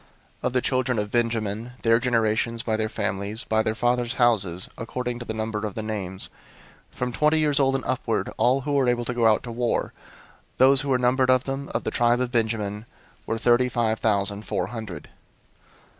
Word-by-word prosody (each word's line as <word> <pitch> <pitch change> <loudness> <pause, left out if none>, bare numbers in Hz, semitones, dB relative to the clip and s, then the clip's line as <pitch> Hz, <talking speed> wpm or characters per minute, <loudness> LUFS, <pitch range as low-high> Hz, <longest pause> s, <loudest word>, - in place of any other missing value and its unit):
001:036 - - -29 0.4
Of - - -3
the 125 - +2
children 130 -2 0
of 105 0 -2
Benjamin, 115 -1 -1
their 115 0 +4
generations, 115 -1 +1
by 110 - 0
their 110 0 -1
families, 100 +3 -2
by 110 0 +1
their 110 0 -1
fathers' 120 +2 0
houses, 100 -8 +1
according 120 +1 -4
to 120 - -7
the 110 - -4
number 110 -1 -2
of 105 -3 -4
the 110 - -3
names, 95 -4 -3 0.6
from 125 0 -3
twenty 150 +4 +3
years 150 -2 +2
old 135 -1 +3
and 135 - -3
upward, 115 -6 -1
all 130 +3 +3
who 145 +2 -4
were 135 -3 +3
able 120 -1 0
to 125 - -2
go 120 -2 +3
out 110 -1 +3
to 120 - -6
war; 120 +1 -1 0.6
001:037 - - -38
those 135 +1 +6
who 145 - -4
were 130 - +3
numbered 125 +1 +2
of 130 -1 +4
them, 135 +1 -4
of - - 0
the - - -2
tribe 120 0 +2
of 125 -1 -1
Benjamin, 110 -2 -1 0.4
were 115 - -1
thirty 120 +2 +3
five 115 -3 0
thousand 100 -1 +1
four 90 - -1
hundred. 110 -3 -7
120 Hz, 205 wpm, -25 LUFS, 110-125 Hz, 0.6 s, those